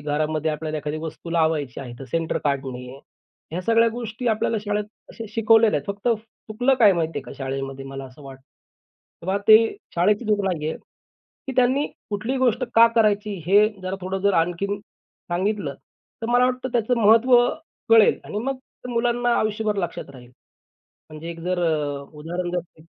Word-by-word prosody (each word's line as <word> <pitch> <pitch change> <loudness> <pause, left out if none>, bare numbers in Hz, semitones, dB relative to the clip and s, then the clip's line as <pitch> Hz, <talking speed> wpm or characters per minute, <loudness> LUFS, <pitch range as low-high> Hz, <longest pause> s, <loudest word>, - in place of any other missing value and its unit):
घरामध्ये 155 +1 -1
आपल्याला 155 0 -3
एखादी 150 +1 -4
वस्तू 165 +1 -7
लावायची 160 -7 0
आहे 125 -3 -8
तर 135 - -8
सेंटर 165 -1 0
काढणे. 135 -3 -2 0.7
ह्या 180 - -2
सगळ्या 230 +2 +4
गोष्टी 235 0 -5
आपल्याला 220 +1 +1
शाळेत 210 0 -1 0.3
असे 225 - -8
शिकवलेल्या 225 -5 +4
आहेत. - - -19
फक्त 205 +4 -3 0.4
चुकलं 245 +5 +2
काय 215 -6 +6
माहितीये 160 -5 -2
का - - -10
शाळेमध्ये, 135 0 -4
मला 135 0 -7
असं 130 +3 -14
वाटतं, 135 -1 -11 0.8
की - - -10
बा 190 +1 +1
ते 215 - +11 0.4
शाळेची 205 +7 +2
चूक 210 -1 +2
नाहीये. 160 -4 -2 0.7
ती - - -2
त्यांनी 260 +3 +3 0.2
कुठली 220 +6 -2
गोष्ट 255 -1 +2
का 230 +1 +8
करायची 210 -1 +2
हे 205 +3 +5
जरा 185 +1 -3
थोडं 185 +1 -3
जर 200 +1 +3
आणखीन 175 +5 0
सांगितलं 190 -4 -4 0.5
तर - - -1
मला 245 +1 +5
वाटतं 255 0 -1
त्याचं 240 +1 +1
महत्त्व 230 +4 +6 0.5
कळेल 225 -2 +6
आणि 210 - -4
मग 265 +4 -2 0.3
मुलांना 240 0 +1
आयुष्यभर 215 0 -1
लक्षात 170 -5 -4
राहील. 125 -2 -14 0.8
म्हणजे 155 +2 -7
एक 165 - -8
जर 180 +2 -1
अ, 145 -3 -1
उदाहरण 175 +4 -4
जर 180 - +1
घेतलं 165 -2 -12
190 Hz, 165 wpm, -23 LUFS, 155-225 Hz, 0.8 s, ते